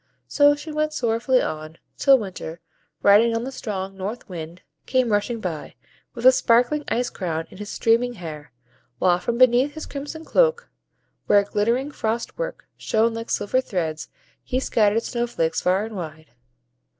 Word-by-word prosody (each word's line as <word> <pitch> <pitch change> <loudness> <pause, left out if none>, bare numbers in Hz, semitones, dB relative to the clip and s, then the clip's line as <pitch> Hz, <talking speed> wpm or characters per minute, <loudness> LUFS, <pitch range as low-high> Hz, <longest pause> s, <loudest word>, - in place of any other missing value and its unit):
So 290 0 +5
she 295 +2 -8
went 305 0 -1
sorrowfully 245 0 +1
on, 155 +1 -5 0.2
till 275 -1 +5
Winter, 185 -6 -7 0.4
riding 225 +3 +5
on 230 - -1
the 265 - -5
strong 195 -6 -5
North 200 +5 -5
Wind, 170 -1 -8 0.2
came 255 -3 +2
rushing 210 +3 0
by, 170 -7 -5 0.4
with 235 0 -5
a 255 - +10
sparkling 250 +4 +2
ice 245 +1 -1
crown 165 -3 -3
in - - -13
his 210 0 -6
streaming 235 +2 +2
hair, 155 - -8 0.5
while 180 +5 +3
from 235 +6 -2
beneath 255 +3 +4
his 315 - -6
crimson 295 +3 -7
cloak, 485 -1 +2 0.6
where 205 0 +5
glittering 230 +8 0
frost 230 -3 -3
work - - -4
shone 225 +1 +1
like 230 0 -6
silver 255 +5 +1
threads, 165 -9 -3 0.3
he 255 - -1
scattered 225 -3 +2
snow 240 -1 -2
flakes 165 -9 -1
far 185 +3 +1
and 220 -1 -8
wide. 155 -5 -8
230 Hz, 160 wpm, -23 LUFS, 185-255 Hz, 0.6 s, a